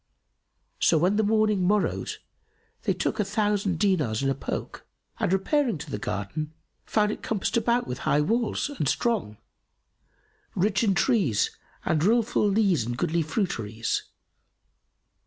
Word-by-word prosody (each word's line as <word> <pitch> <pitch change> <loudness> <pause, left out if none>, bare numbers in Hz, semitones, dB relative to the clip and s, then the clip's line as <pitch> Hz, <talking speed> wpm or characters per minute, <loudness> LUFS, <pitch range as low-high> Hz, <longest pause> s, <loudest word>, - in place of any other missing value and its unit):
So 165 - +4
when 180 +6 +2
the 220 - +3
morning 215 -2 +2
morrowed 200 +3 0 0.7
they - - +2
took - - -2
a - - +3
thousand 205 -4 0
dinars 150 - +1
in 135 - +2
a - - +2
poke - - -5 0.4
and, - - 0
repairing 230 - +1
to - - -8
the 105 - -3
garden, 150 +13 -4 0.3
found 210 -1 +2
it - - -6
compassed 215 -3 -1
about 235 +1 +2
with 125 +1 -5
high 145 - +2
walls 230 - 0
and 150 - -1
strong, 215 - -1 1.2
rich 195 +3 +1
in 200 -4 +2
trees 190 - +2 0.3
and 155 -1 +1
rill 230 +5 +4
full 220 -2 +1
leas 195 - +2
and 120 +1 -4
goodly 165 +5 +1
fruiteries. 115 - -2
195 Hz, 145 wpm, -26 LUFS, 150-215 Hz, 1.2 s, So